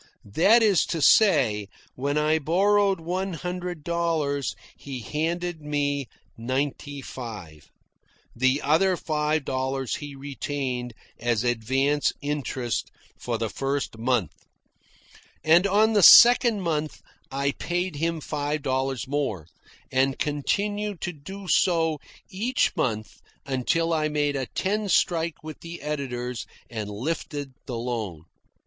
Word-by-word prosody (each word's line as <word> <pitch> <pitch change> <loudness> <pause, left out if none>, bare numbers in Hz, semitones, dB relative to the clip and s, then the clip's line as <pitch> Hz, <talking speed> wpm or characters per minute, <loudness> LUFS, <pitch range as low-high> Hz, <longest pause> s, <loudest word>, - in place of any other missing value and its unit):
That 220 - +5
is 205 -5 +4
to 165 - -2
say, 135 - +4 0.3
when 140 +3 -1
I 155 +1 +2
borrowed 195 +4 +2
one 185 +3 -3
hundred 180 -1 -5
dollars, 160 -5 -1 0.2
he 135 -3 -7
handed 165 +5 -2
me 145 -2 -1 0.3
ninety 135 +3 -3
five. 105 - -9 0.7
The 130 +4 +2
other 175 +6 +3
five 155 -2 -1
dollars 130 -1 -2
he 145 -1 -8
retained 135 -3 -4 0.2
as 120 -1 0
advance 130 +5 +1
interest 135 -5 -2 0.3
for - - -2
the - - -1
first 135 -4 -2
month. 120 -4 +1 1.1
And 170 +5 +5
on 215 +3 +3
the 205 - +4
second 235 +2 +8
month 155 -3 -2 0.3
I 140 +1 0
paid 175 +1 -3
him 165 +1 -1
five 145 0 -3
dollars 130 -3 -1
more, 135 - -2 0.5
and 135 +1 +2
continued 205 +8 -1
so 180 - -1
to - - -15
do 165 -1 0 0.3
each 235 +7 0
month 110 -3 -2 0.2
until 140 +5 0
I 155 -1 +1
made 145 -1 0
a 135 -2 -2
ten 205 +2 -1
strike 165 -2 +1
with 155 -1 -8
the 170 0 -8
editors 125 -5 -4 0.2
and 110 -3 -4
lifted 145 +4 -4 0.2
the 125 -3 -3
loan. 110 -9 -4
145 Hz, 125 wpm, -25 LUFS, 130-170 Hz, 1.1 s, second